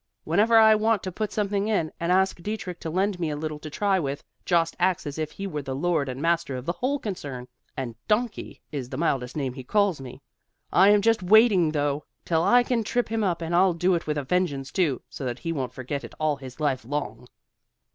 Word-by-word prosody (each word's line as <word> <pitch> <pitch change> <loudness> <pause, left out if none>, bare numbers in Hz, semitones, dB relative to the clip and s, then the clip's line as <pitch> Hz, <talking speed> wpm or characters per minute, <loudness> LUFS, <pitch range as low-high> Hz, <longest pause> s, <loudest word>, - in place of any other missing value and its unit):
Whenever 215 +8 +4
I 220 -1 +8
want 215 -1 +2
to 185 - -4
put 215 +4 -3
something 205 -1 -1
in, 185 -8 0
and 170 +1 0
ask 190 -1 +2
Dietrich 190 -3 -5
to 165 - -5
lend 190 +3 0
me 165 -3 -1
a 150 - -2
little 155 0 -4
to 155 - -8
try 195 +4 +1
with, 140 -3 -3 0.2
Jost 165 -2 +2
acts 180 -1 +1
as 145 +1 -5
if 155 -1 -2
he 195 - -7
were 150 -6 -3
the 135 -1 -5
lord 155 -2 0
and 130 +1 -5
master 170 -2 0
of 125 0 -6
the 170 - 0
whole 255 +9 -1
concern, 145 - -6 0.3
and 125 -3 -3
'donkey' 220 +1 -1
is 135 -5 -4
the 130 - -5
mildest 135 -4 -1
name 135 -4 -2
he 130 0 -8
calls 200 0 +1
me. 125 -2 -9 0.5
I 190 +3 +6
am 205 -1 +5
just 225 -1 +3
waiting 195 -4 +5
though, 145 -1 -1 0.2
till 160 -2 +2
I 245 +6 +5
can 240 -2 0
trip 240 +2 -1
him 225 -1 0
up, 175 -4 0
and 165 +1 -3
I'll 180 +1 +4
do 180 +2 +2
it 170 -2 -1
with 150 -1 -1
a 145 - -1
vengeance 140 -4 -1
too, 155 -9 0
so - - -8
that 120 -2 -3
he 165 0 -3
won't 130 -5 -3
forget 130 +3 -5
it - - -10
all 155 -2 +1
his 130 +1 -11
life 140 -4 0
long." 125 -2 -4
170 Hz, 235 wpm, -25 LUFS, 140-200 Hz, 0.5 s, I